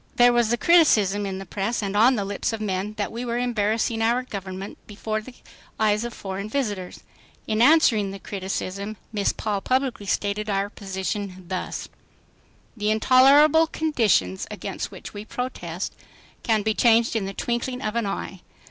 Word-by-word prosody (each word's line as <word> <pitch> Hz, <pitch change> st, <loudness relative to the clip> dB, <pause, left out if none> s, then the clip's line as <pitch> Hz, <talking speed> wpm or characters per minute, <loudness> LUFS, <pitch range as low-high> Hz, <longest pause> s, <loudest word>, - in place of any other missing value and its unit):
There 245 Hz, 0 st, +6 dB
was 240 Hz, -2 st, +2 dB
the 240 Hz, -, +2 dB
criticism 210 Hz, -, +4 dB
in 190 Hz, -1 st, -4 dB
the 195 Hz, -, -7 dB
press 205 Hz, +5 st, -2 dB
and 200 Hz, 0 st, -3 dB
on 235 Hz, +5 st, +5 dB
the 200 Hz, -3 st, -2 dB
lips 200 Hz, +2 st, -2 dB
of 225 Hz, -, -4 dB
men 200 Hz, 0 st, -2 dB
that 205 Hz, -, -2 dB
we 235 Hz, +2 st, -5 dB
were 240 Hz, -1 st, -2 dB
embarrassing 225 Hz, -1 st, 0 dB
our 235 Hz, +3 st, +2 dB
Government 195 Hz, -4 st, -7 dB
before 215 Hz, +1 st, -3 dB
the 245 Hz, +3 st, -12 dB, 0.4 s
eyes 215 Hz, 0 st, +2 dB
of 240 Hz, -, -4 dB
foreign 195 Hz, 0 st, -6 dB
visitors. 205 Hz, -9 st, -3 dB, 0.4 s
In 215 Hz, 0 st, 0 dB
answering 245 Hz, -8 st, +5 dB
the 195 Hz, -, -6 dB
criticism, 195 Hz, +1 st, -4 dB, 0.2 s
Miss 205 Hz, -2 st, +1 dB
Paul 205 Hz, -2 st, -3 dB
publicly 255 Hz, -5 st, -1 dB
stated 205 Hz, +1 st, -1 dB
our 200 Hz, 0 st, 0 dB
position 190 Hz, -1 st, -5 dB
thus: 185 Hz, 0 st, -4 dB, 0.9 s
"The 210 Hz, -2 st, -1 dB
intolerable 275 Hz, +8 st, +6 dB
conditions 225 Hz, -, +1 dB
against -, -, -5 dB
which -, -, -10 dB
we 205 Hz, -, -6 dB
protest 200 Hz, -8 st, -5 dB, 0.5 s
can 220 Hz, -2 st, +1 dB
be 220 Hz, +1 st, +1 dB
changed 230 Hz, 0 st, +3 dB
in 215 Hz, -3 st, 0 dB
the -, -, -4 dB
twinkling 250 Hz, +2 st, -2 dB
of 215 Hz, +1 st, -2 dB
an 235 Hz, -3 st, 0 dB
eye. 195 Hz, -1 st, -5 dB
215 Hz, 165 wpm, -24 LUFS, 195-240 Hz, 0.9 s, There